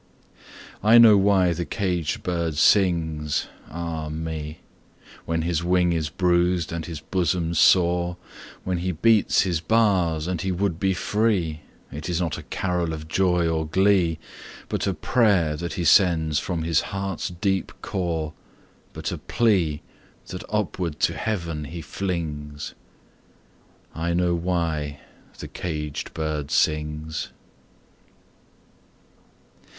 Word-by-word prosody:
I 110 +3 +7
know 115 -3 +9
why 95 -3 +4
the 85 +1 -3
caged 85 -1 -2
bird 85 -3 -1
sings, 80 -5 +2 0.2
ah 80 -2 -4
me, 80 -1 -5 0.6
When 80 0 -1
his 85 -1 -1
wing 90 -1 +2
is 80 -2 -1
bruised 90 +1 +1
and 85 0 -3
his 80 -3 -6
bosom 85 0 -1
sore, 90 +1 +3 0.5
When 90 -2 -1
he 90 +1 -1
beats 110 +5 +4
his 85 -4 -1
bars 90 -6 +2
and 90 -3 -2
he 95 0 -1
would 90 -2 -1
be 95 -1 +1
free; 90 -6 0 0.3
It 75 +3 -6
is 85 -1 0
not 85 -4 -2
a - - -13
carol 90 -3 -1
of 80 0 -7
joy 90 0 +2
or 80 -1 -1
glee, 95 -2 +3 0.5
But - - -1
a 95 - 0
prayer 90 -4 +2
that 85 +2 -4
he 85 - -2
sends 80 -5 +4
from 85 -3 -3
his 80 -2 +2
heart's 95 -1 -4
deep 95 +2 -1
core, 80 -5 -2 0.6
But - - -4
a - - -4
plea, 90 -10 +1 0.5
that 90 - -6
upward 90 -7 -2
to 80 +2 +3
Heaven 85 -9 -3
he 80 +3 -7
flings 75 -6 -4 1.2
I 85 +1 -1
know 90 0 +2
why 85 -4 -2 0.4
the - - -7
caged 75 -4 -5
bird 75 -2 -2
sings! 75 +1 -1
85 Hz, 130 wpm, -24 LUFS, 80-95 Hz, 1.2 s, know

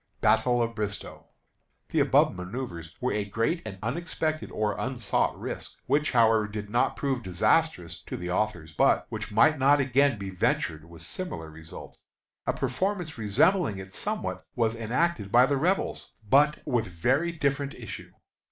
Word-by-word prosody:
BATTLE 120 -1 +3
OF 115 0 -3
BRISTOE. 105 -2 -5 0.6
The - - +1
above - - +4
manoeuvre 90 -1 -5 0.2
was 125 -4 0
a 105 - 0
great 115 - -1
and 105 -3 -7
unexpected 155 +4 -2
or 105 -2 -1
unsought 125 -4 0
risk, - - -6
which, 145 +3 +2
however, 115 -3 +4
did 105 -1 -6
not 120 - +2
prove 135 -3 -1
disastrous 105 - +1
to - - -4
the 90 0 -4
authors, 90 -6 -1
but - - +3
which - - -5
might 140 +8 +4
not 140 +2 +5
again 135 -1 +3
be 100 -1 -5
ventured 80 -3 0
with 85 0 -11
similar 80 - -5
results. 80 +1 -11 0.5
A - - +2
performance 165 - -2
resembling 110 - +2
it 95 0 -9
somewhat - - -3
was 115 -1 +1
enacted 115 -1 -1
by 125 +3 +7
the 140 - +1
Rebels, 180 +7 0 0.2
but 145 +6 +4
with 120 -6 0
very 130 - +1
different 140 -3 -1
issue. - - -8
115 Hz, 155 wpm, -27 LUFS, 100-140 Hz, 0.6 s, by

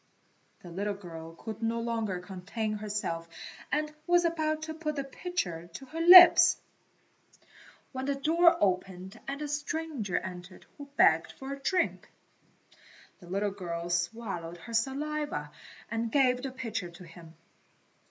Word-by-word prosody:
The 175 - -10
little 200 +3 -2
girl 165 -4 -10
could 220 +4 -8
no 230 +1 0
longer 225 -5 -2
contain 195 +4 -4
herself 200 -6 -3 0.4
and 300 +1 -1
was 350 0 +4
about 310 -2 0
to 315 0 -5
put 310 -1 -3
the 280 - -2
pitcher 190 - -4
to 270 - -8
her 320 +5 -5
lips, 355 +1 +10 1.3
when 260 -1 -4
the 280 0 0
door 335 +5 +4
opened 190 +1 -1
and 280 +2 -4
a - - -3
stranger 295 - -3
entered 180 0 -7
who 285 - -8
begged 160 +1 +4
for 270 +1 -7
a 280 - -8
drink. 365 +6 -1 1.1
The 175 - -14
little 200 +2 0
girl 175 -3 -5
swallowed 175 -2 -3
her 200 +7 -10
saliva 270 - -2 0.4
and 230 0 -2
gave 250 -2 +3
the 270 - -3
pitcher 225 -8 -4
to 175 +1 -13
him. 165 -1 -14
225 Hz, 145 wpm, -30 LUFS, 180-290 Hz, 1.3 s, lips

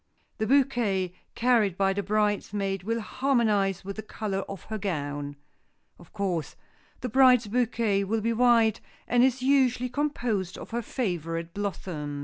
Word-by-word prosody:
The 220 - 0
bouquet 235 -9 +2 0.2
carried 230 -6 +2
by 195 -1 +2
the 200 - -1
bridesmaid 205 -1 0
will 230 +4 -2
harmonize 210 -7 +1
with 200 +1 -6
the - - -3
color 210 -2 -4
of 195 -4 -7
her 220 -1 -5
gown. 145 -6 -3 0.6
Of 175 - -16
course, 185 -6 -2 0.5
the 250 - -2
bride's 250 -1 +5
bouquet 225 -3 +1
will 220 +3 -1
be 230 +2 0
white, 230 -2 +4 0.3
and 245 0 +4
is 260 0 +2
usually 255 -2 +3
composed 240 -9 -2
of - - -10
her 235 +1 -1
favorite 170 - -3
blossoms. 170 -8 -4
210 Hz, 145 wpm, -27 LUFS, 190-240 Hz, 0.6 s, bride's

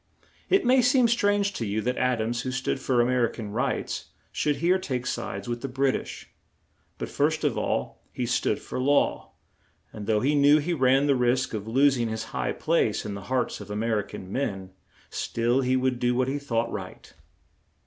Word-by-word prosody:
It 390 +1 +3
may 255 +1 +5
seem 250 0 +4
strange 205 -3 +2
to 120 - -4
you 105 0 -1
that 125 +3 -1
Ad 125 -3 +1
ams, 120 +1 -2
who 130 - -4
stood 135 +1 -2
for 130 -2 +2
A - - +3
mer 125 -1 +2
i - - -10
can 105 -3 -7
rights, 115 +4 -2 0.3
should 150 -1 0
here 180 +4 +2
take 130 -8 -3
sides 100 -4 -4
with 120 0 -3
the 135 - -3
Brit 135 +1 +1
ish; - - -7 0.7
but, - - -4
first - - 0
of - - +1
all, - - -2
he - - -3
stood - - +1
for - - -6
law; 140 +3 +1 0.6
and, 105 -1 -7
though 110 -2 +2
he 140 +3 +2
knew 145 +1 +6
he 160 +4 -1
ran 135 -1 +3
the 145 - +4
risk 125 0 +1
of 105 -1 -4
los 135 +4 +4
ing 120 -1 -1
his 110 0 -3
high - - -1
place 155 -12 0
in 105 - -4
the 100 -1 -7
hearts 130 -4 -1
of 100 - -10
A 105 - -4
mer 110 0 0
i - - +1
can 95 -2 -9
men, 95 -8 -3 0.4
still 120 +3 0
he 130 0 +1
would 130 -1 0
do 125 0 +1
what 130 0 +1
he 140 +2 -1
thought 115 -4 -1
right. 95 -3 -8
125 Hz, 215 wpm, -26 LUFS, 115-140 Hz, 0.7 s, knew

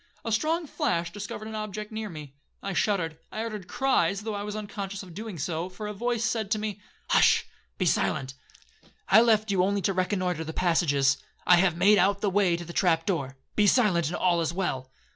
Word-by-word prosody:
A 225 - -2
strong 320 +9 +1
flash 175 - -1
discovered 205 +2 -6
an 220 - -7
object 215 0 -5
near 215 -1 -4
me. 150 -5 -9 0.3
I 195 - -3
shuddered,—I 180 +2 -2
uttered 210 -5 -6
cries, 200 -8 +1
though 220 0 -4
I 200 - -3
was 210 0 -5
unconscious 200 -2 -5
of 180 -3 -12
doing 215 0 -6
so, 165 +4 -3
for 185 +3 -8
a 210 - -4
voice 235 +2 -1
said 220 -2 -1
to 215 - +1
me,—'Hush, 210 -1 +1 0.3
be 185 - 0
silent; 135 -5 0 0.8
I 215 +4 +8
left 220 -2 +3
you 185 -2 +3
only 200 0 0
to 195 - +1
reconnoitre 185 -2 -1
the 160 0 -6
passages. 145 -6 +2 0.3
I 180 - +7
have 175 -2 +2
made 200 +3 +5
out 200 +2 +3
the 205 - +1
way 185 -3 +2
to 170 - -7
the 170 - -9
trap 165 -3 +2
door,—be 140 +3 -1
silent, 195 - +3
and 170 - -3
all 175 -2 +2
is 165 - 0
well.' 135 -8 -3
195 Hz, 200 wpm, -27 LUFS, 170-215 Hz, 0.8 s, I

